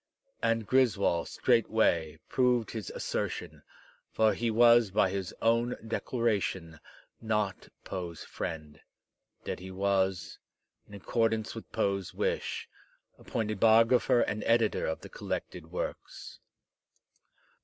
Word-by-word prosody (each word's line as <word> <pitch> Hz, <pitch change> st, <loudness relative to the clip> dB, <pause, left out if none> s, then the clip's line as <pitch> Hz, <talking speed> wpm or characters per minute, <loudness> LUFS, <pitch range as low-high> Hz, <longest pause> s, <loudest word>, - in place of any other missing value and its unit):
And 115 Hz, -1 st, +1 dB
Griswold 105 Hz, -9 st, +2 dB
straightway 110 Hz, -10 st, +2 dB
proved 125 Hz, -3 st, +1 dB
his 110 Hz, -5 st, -5 dB
assertion, -, -, -4 dB, 0.5 s
for 110 Hz, -1 st, +3 dB
he 115 Hz, +3 st, -1 dB
was 120 Hz, 0 st, +6 dB
by 95 Hz, -1 st, +2 dB
his 95 Hz, -2 st, -3 dB
own 115 Hz, +2 st, +2 dB
dec 115 Hz, 0 st, -5 dB
laration 100 Hz, -9 st, -1 dB, 0.4 s
not 105 Hz, -3 st, -2 dB
Poe's 85 Hz, -4 st, -6 dB
friend, 75 Hz, -2 st, -6 dB, 0.6 s
yet -, -, -4 dB
he 95 Hz, +1 st, -9 dB
was, 95 Hz, -1 st, -1 dB, 0.5 s
in 100 Hz, -, -11 dB
accordance 110 Hz, +2 st, 0 dB
with 115 Hz, -, -10 dB
Poe's 100 Hz, -2 st, -1 dB
wish, -, -, -2 dB, 0.5 s
appointed 110 Hz, -2 st, -3 dB
biographer 115 Hz, +3 st, +5 dB
and 105 Hz, -, -1 dB
editor 115 Hz, -2 st, +2 dB
of 80 Hz, -, -3 dB
the -, -, -10 dB
collected -, -, -5 dB
works. -, -, -6 dB
110 Hz, 110 wpm, -30 LUFS, 95-115 Hz, 0.6 s, was